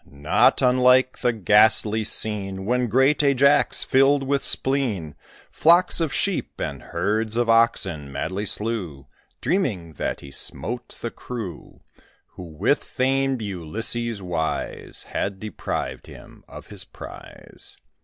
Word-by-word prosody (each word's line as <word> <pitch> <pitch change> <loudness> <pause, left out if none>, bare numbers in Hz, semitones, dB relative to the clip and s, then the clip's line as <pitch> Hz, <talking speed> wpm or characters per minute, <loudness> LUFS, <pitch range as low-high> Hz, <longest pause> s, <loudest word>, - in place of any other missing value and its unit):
Not 70 - +2
unlike 125 0 +4
the 125 - +2
ghastly 110 +1 +3
scene 95 -3 0
When 125 +2 0
great 135 +7 +3
Ajax, 140 0 +4
filled 135 +1 +3
with 140 +1 -1
spleen, 115 - 0 0.4
Flocks 170 +2 +4
of 160 -4 0
sheep 200 +4 -2
and - - -4
herds 105 +6 -2
of 120 -1 +1
oxen 95 -10 +1
madly 95 +9 -4
slew, 100 -11 -4 0.4
Dreaming 100 - -1
that - - -3
he 70 - -11
smote 120 - -4
the 115 - -4
crew 115 -8 -8 0.5
Who, 90 - -11
with 80 -2 0
famed 135 -1 -1
Ulysses 105 +4 -3
wise, 85 -3 -3
Had 100 -1 -3
deprived 110 +1 -5
him - - -14
of - - -11
his - - -1
prize. - - -12
115 Hz, 125 wpm, -23 LUFS, 95-130 Hz, 0.5 s, unlike